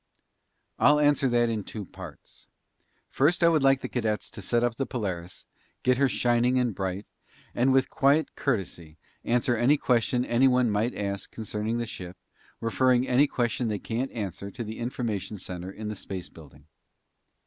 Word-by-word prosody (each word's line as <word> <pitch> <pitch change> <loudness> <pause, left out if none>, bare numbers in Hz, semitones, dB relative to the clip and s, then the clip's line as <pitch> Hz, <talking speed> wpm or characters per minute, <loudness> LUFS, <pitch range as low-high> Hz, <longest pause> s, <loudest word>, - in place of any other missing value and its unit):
"I'll 150 +1 +6
answer 145 -2 +3
that 120 0 +3
in 110 -3 -2
two 105 0 -7
parts. - - -12 0.6
First, 160 +6 +2
I 170 - +7
would 160 -3 +3
like 135 0 +4
the - - -3
cadets 110 -4 -2
to - - -8
set 120 +5 +1
up 120 -1 0
the 135 - -2
Polaris, 95 -7 -5 0.4
get 125 0 +3
her 140 -1 +4
shining 120 +1 +2
and 125 -3 +1
bright, 95 +1 -3 0.5
and 125 +3 +2
with 130 0 +2
quiet 140 +3 +2
courtesy, 90 - -3 0.3
answer 120 +1 +1
any 125 +6 +4
question 125 -1 +1
anyone 125 -1 +3
might 105 +4 0
ask 100 -1 -3
concerning 110 +1 -3
the 120 - -2
ship, 90 -4 -8 0.4
referring 125 +2 +2
any 130 +4 +4
question 120 -2 -1
they 105 -2 -1
can't 120 +6 -3
answer 100 -3 -5
to 120 +4 -6
the 110 0 -7
information 115 -4 -3
center 90 0 -6
in 105 +2 -7
the 105 - -4
Space 95 -2 -7
Building." 75 -2 -16
120 Hz, 170 wpm, -27 LUFS, 100-130 Hz, 0.6 s, I